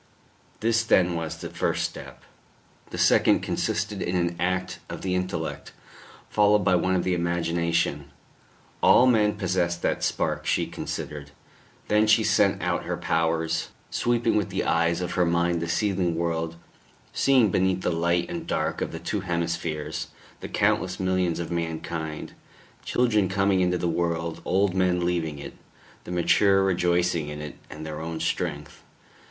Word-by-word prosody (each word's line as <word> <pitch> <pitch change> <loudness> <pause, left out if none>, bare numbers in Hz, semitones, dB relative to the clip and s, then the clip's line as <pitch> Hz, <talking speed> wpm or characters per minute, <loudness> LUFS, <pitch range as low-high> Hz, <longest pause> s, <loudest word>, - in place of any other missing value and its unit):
This 115 +1 +2
then 90 -6 +3
was 80 -1 -4
the - - -7
first - - -1
step. - - -11 0.7
The - - -7
second - - +4
consisted 100 +1 -2
in 90 - -1
an 85 -1 0
act 90 +1 -1
of - - -7
the 95 -1 -1
intellect, 90 -3 -3 0.5
followed 105 -1 +3
by 95 - +4
one 90 +1 +2
of 90 - +1
the 95 - 0
imagination. 85 -4 0 0.7
All 125 - +6
men 110 -4 +3
possessed 90 -3 -1
that - - 0
spark, - - -1
she - - +2
considered.... 75 -1 -6 0.6
Then 105 +1 +3
she 110 - +5
sent - - +2
out - - -1
her - - -2
powers, 80 0 0 0.2
sweeping 120 -1 +1
with 105 -3 +1
the - - -1
eyes 85 +1 +1
of 90 - -3
her 90 - +2
mind 85 0 +1
the 85 - -3
seething 95 -3 0
world, 80 -1 -2 0.6
seeing 130 -7 +4
beneath 95 0 +1
the - - 0
light 85 +1 +1
and 170 -1 -6
dark 80 - -1
of - - -2
the - - -5
two 105 - -2
hemispheres, 85 -4 -3 0.3
the - - -7
countless 90 0 +1
millions 95 -2 0
of 85 0 -4
mankind 80 -2 -4 0.5
children 110 -6 +2
coming 95 0 +2
into 90 0 +2
the 85 - -1
world, 85 -1 -1
old 95 0 +2
men 90 -2 +1
leaving 85 -4 -1
it, 70 - -8 0.5
the - - -7
mature 95 +3 +3
rejoicing 90 -3 +1
in 75 0 -6
it 75 -1 -6 0.2
and 80 +1 -8
their 75 0 -5
own 80 0 -4
strength. - - -3
85 Hz, 160 wpm, -25 LUFS, 85-95 Hz, 0.7 s, All